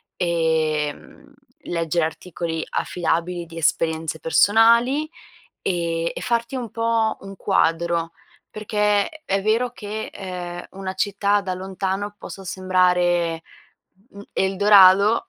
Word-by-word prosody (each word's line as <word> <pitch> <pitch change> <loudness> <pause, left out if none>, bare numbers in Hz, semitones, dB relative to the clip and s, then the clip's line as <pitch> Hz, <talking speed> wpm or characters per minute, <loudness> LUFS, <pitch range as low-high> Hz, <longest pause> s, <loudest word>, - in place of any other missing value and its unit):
ehm, 160 - -1 0.3
leggere 165 -1 -1
articoli 165 0 -4
affidabili 175 0 -2
di 165 0 -12
esperienze 160 0 0
personali, 235 - +4 0.5
e 170 -2 -1
e - - -5
farti 235 +2 -1
un 245 -3 -4
po' 230 -1 0
un 195 0 -9
quadro 165 -1 0 0.4
perché, 210 -1 0 0.2
è 195 0 0
vero 225 +4 +1
che, 215 -2 -6
ehm, 180 -2 -6
una 190 -1 -6
città 205 +1 +1
da 190 -2 -3
lontano 190 +2 -4
possa 195 - -9
sembrare, 180 -3 +1 0.7
mhmm, 200 - -12
Eldorado 200 - +5
185 Hz, 105 wpm, -22 LUFS, 170-205 Hz, 0.7 s, Eldorado